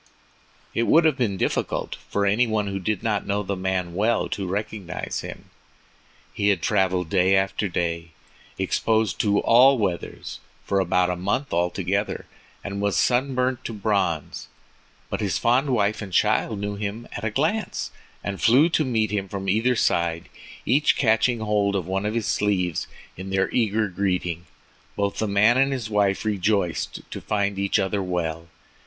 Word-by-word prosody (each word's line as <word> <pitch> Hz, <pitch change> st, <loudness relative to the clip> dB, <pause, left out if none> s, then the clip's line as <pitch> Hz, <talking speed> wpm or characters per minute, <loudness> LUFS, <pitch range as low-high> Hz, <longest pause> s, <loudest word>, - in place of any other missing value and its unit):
It 115 Hz, -, 0 dB
would 165 Hz, +1 st, +5 dB
have 155 Hz, -3 st, +4 dB
been 115 Hz, -8 st, -1 dB
difficult -, -, -1 dB
for 100 Hz, 0 st, 0 dB
any 110 Hz, +5 st, +3 dB
one 110 Hz, -2 st, 0 dB
who 100 Hz, -1 st, -3 dB
did 105 Hz, +2 st, -2 dB
not 105 Hz, -3 st, -1 dB
know 100 Hz, 0 st, 0 dB
the 100 Hz, 0 st, -2 dB
man 95 Hz, -2 st, -2 dB
well 110 Hz, +6 st, +1 dB
to 100 Hz, -2 st, -3 dB
recognize 100 Hz, -1 st, -4 dB
him. -, -, -9 dB, 0.8 s
He 100 Hz, -, 0 dB
had 100 Hz, -2 st, +2 dB
traveled 95 Hz, -2 st, +1 dB
day 95 Hz, +2 st, +3 dB
after 95 Hz, +1 st, 0 dB
day, 85 Hz, -1 st, -2 dB, 0.5 s
exposed 110 Hz, -3 st, 0 dB
to 100 Hz, -1 st, +2 dB
all 130 Hz, +4 st, +6 dB
weathers, 95 Hz, -6 st, -3 dB, 0.3 s
for 100 Hz, -, +1 dB
about 90 Hz, 0 st, +2 dB
a -, -, -1 dB
month 100 Hz, +10 st, -2 dB
altogether, 90 Hz, +4 st, -1 dB, 0.4 s
and 100 Hz, 0 st, -4 dB
was 100 Hz, -1 st, +1 dB
sunburnt 125 Hz, +4 st, +1 dB
to 115 Hz, -, -4 dB
bronze, 100 Hz, -7 st, -1 dB, 0.6 s
but -, -, -2 dB
his 100 Hz, -2 st, 0 dB
fond 130 Hz, +4 st, +2 dB
wife 105 Hz, -4 st, +1 dB
and 100 Hz, -3 st, -7 dB
child 105 Hz, +4 st, +2 dB
knew 100 Hz, +1 st, -3 dB
him 105 Hz, +3 st, -4 dB
at 100 Hz, -, -6 dB
a 110 Hz, -, 0 dB
glance, 140 Hz, -, -1 dB, 0.3 s
and 100 Hz, -1 st, -4 dB
flew 135 Hz, +8 st, +5 dB
to 160 Hz, -, +2 dB
meet 110 Hz, -6 st, 0 dB
him 100 Hz, -2 st, -2 dB
from 95 Hz, 0 st, -5 dB
either 115 Hz, +6 st, +2 dB
side, 85 Hz, -6 st, 0 dB, 0.4 s
each 140 Hz, +6 st, +3 dB
catching 115 Hz, -1 st, +2 dB
hold 105 Hz, -2 st, +1 dB
of 95 Hz, -4 st, -1 dB
one 95 Hz, +3 st, -1 dB
of 105 Hz, -, -2 dB
his 115 Hz, -2 st, -1 dB
sleeves 90 Hz, -5 st, 0 dB, 0.3 s
in 95 Hz, +1 st, -7 dB
their 95 Hz, 0 st, 0 dB
eager 110 Hz, -2 st, +1 dB
greeting. 90 Hz, -3 st, -2 dB, 0.5 s
Both 100 Hz, -1 st, -1 dB
the 110 Hz, -, 0 dB
man 105 Hz, +4 st, +4 dB
and 135 Hz, +1 st, +3 dB
his 120 Hz, -5 st, -4 dB
wife 100 Hz, -1 st, +1 dB
rejoiced 100 Hz, -4 st, 0 dB
to -, -, -6 dB
find 100 Hz, -2 st, -1 dB
each 100 Hz, 0 st, +1 dB
other 95 Hz, +1 st, 0 dB
well. 85 Hz, -3 st, -3 dB
100 Hz, 170 wpm, -24 LUFS, 95-110 Hz, 0.8 s, all